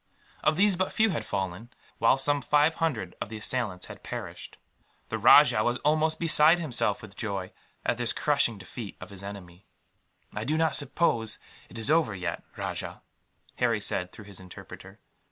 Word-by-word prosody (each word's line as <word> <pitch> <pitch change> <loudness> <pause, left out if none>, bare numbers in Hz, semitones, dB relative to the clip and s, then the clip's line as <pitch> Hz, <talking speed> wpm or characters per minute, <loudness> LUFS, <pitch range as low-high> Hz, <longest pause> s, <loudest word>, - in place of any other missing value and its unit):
Of 155 - +3
these 200 0 +4
but 185 +1 -1
few 220 -1 +2
had 130 -10 -3
fallen, 95 +2 -4 0.3
while 115 +3 +4
some 145 +1 +2
five 150 +3 +3
hundred 115 - -1
of - - -4
the 110 - -6
assailants 105 -4 -1
had - - -11
perished. - - -8 0.5
The - - -3
rajah 110 - +7
was 120 +2 0
almost 155 +1 +2
beside 160 0 +5
himself 120 -11 -1
with 105 -2 -11
joy, 100 -4 -4 0.3
at 120 - +1
this 120 -1 0
crushing 140 -7 +1
defeat 100 +3 -9
of - - -10
his 100 -1 -7
enemy. 100 -2 -10 0.7
"I 105 - -4
do 150 +7 0
not 160 0 +2
suppose 135 -6 +1 0.3
it - - -10
is 115 +6 +1
over 155 -10 +2
yet, 90 -2 -4 0.2
Rajah," - - -5 0.5
Harry - - +1
said, 90 0 -1
through 105 - -13
his 100 -2 -10
interpreter. 90 -1 -12
120 Hz, 170 wpm, -27 LUFS, 100-155 Hz, 0.7 s, rajah